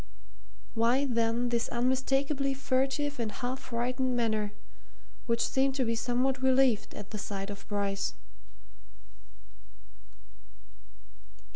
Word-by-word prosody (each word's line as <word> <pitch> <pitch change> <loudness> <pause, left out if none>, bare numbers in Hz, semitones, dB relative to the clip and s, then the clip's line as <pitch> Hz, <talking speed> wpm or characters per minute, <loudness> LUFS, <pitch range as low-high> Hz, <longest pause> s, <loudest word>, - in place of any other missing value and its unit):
Why, 240 +4 +3
then, 235 -1 +1
this 235 -1 0
unmistakably 270 +3 +1
furtive 270 +2 0
and 225 -2 -1
half 250 +4 -3
frightened 250 +2 -1
manner 215 -3 +1 0.8
which 230 0 +2
seemed 270 0 +2
to 260 -2 +1
be 230 - +1
somewhat 250 +3 0
relieved 260 -4 +3
at 205 -1 -8
the 215 - -4
sight 195 0 -4
of 200 - -10
Bryce? 200 -1 -1
245 Hz, 105 wpm, -30 LUFS, 225-265 Hz, 0.8 s, Why